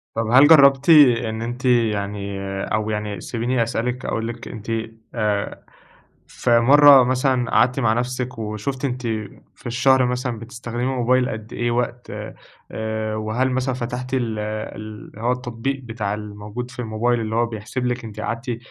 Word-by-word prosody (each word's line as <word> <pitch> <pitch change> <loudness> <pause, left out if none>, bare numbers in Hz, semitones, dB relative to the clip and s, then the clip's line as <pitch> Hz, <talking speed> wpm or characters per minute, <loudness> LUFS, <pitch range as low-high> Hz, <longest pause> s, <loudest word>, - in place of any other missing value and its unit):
طب 115 -1 -1
هل 135 +3 +8
جرّبتِ 140 -1 +6
إن 120 -7 +5
أنتِ 120 +3 -5
يعني 105 -4 0 0.2
أو 110 0 -1
يعني 105 -1 -3
سيبيني 120 +1 -1
أسألِك 120 +2 -3
أقول 115 0 -2
لِك 120 0 -7
أنتِ 110 0 -7 0.4
آآ، 105 -2 -2 0.6
في 120 -1 +2
مَرّة 140 +1 +8
مثلًا 130 -1 +1
قعدتِ 125 +4 +3
مع 115 -4 +2
نفْسِك 125 +1 -3
وشُفتِ 110 +6 -4
أنتِ 125 -1 -3 0.5
في - - -22
الشهر 130 +1 +3
مثلًا 125 -2 -2
بتستخدمي 120 +1 -6
الموبايل 130 -1 +1
قد 110 0 -7
إيه 120 0 -1
وقت، 120 0 -2 0.6
آآ 110 0 -3
وهل 110 +5 -1
مثلًا 130 +1 -1
فتحتي 125 +2 -3
ال 115 -3 -2
اللي 110 0 -7
هو 120 +2 +1
التطبيق 125 +2 -3
بتاع 110 -3 -3
الموجود 105 +3 -7
في 120 - -13
الموبايل 120 +1 0
اللي 110 0 -3
هو 120 +1 +3
بيحسب 115 +3 -5
لِك 125 -1 -2
أنتِ 110 -1 -9
قعدتِ 115 +2 -3
120 Hz, 155 wpm, -21 LUFS, 110-125 Hz, 0.6 s, هل